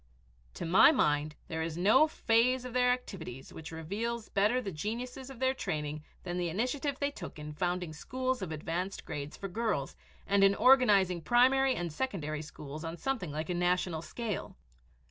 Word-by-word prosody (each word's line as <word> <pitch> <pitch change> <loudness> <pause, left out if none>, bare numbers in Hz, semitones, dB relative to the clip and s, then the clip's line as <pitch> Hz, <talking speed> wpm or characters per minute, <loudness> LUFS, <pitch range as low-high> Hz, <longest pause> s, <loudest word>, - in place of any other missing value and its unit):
To - - -4
my 190 - +7
mind 150 - +1
there 160 -1 -3
is 160 0 -3
no 220 - +5
phase 250 -2 +2
of 250 - -6
their 250 0 +3
activities 170 - -5
which 160 0 -8
reveals 215 +8 -4
better 210 +5 +2
the 205 -6 -4
genuineness 240 - -5
of 270 - -9
their 260 +1 +2
training 150 - -3 0.2
than 175 0 -3
the 175 -1 0
initiative 255 - -1
they 280 0 0
took - - -8
in 150 0 -7
founding 175 +1 -2
schools 255 +8 -2
of 180 -4 -4
advanced 170 +5 -3
grades 145 0 -5
for 195 - -5
girls, 210 -8 -2 0.3
and 200 0 +3
in 195 0 +6
organizing 205 -10 +5
primary 260 +5 +4
and 170 -3 -3
secondary 155 - -2
schools 150 0 -8
on 165 +1 -5
something 250 - -2
like 155 +3 -3
a - - +1
national 175 -2 0
scale. 220 +4 -5
195 Hz, 175 wpm, -31 LUFS, 160-250 Hz, 0.3 s, my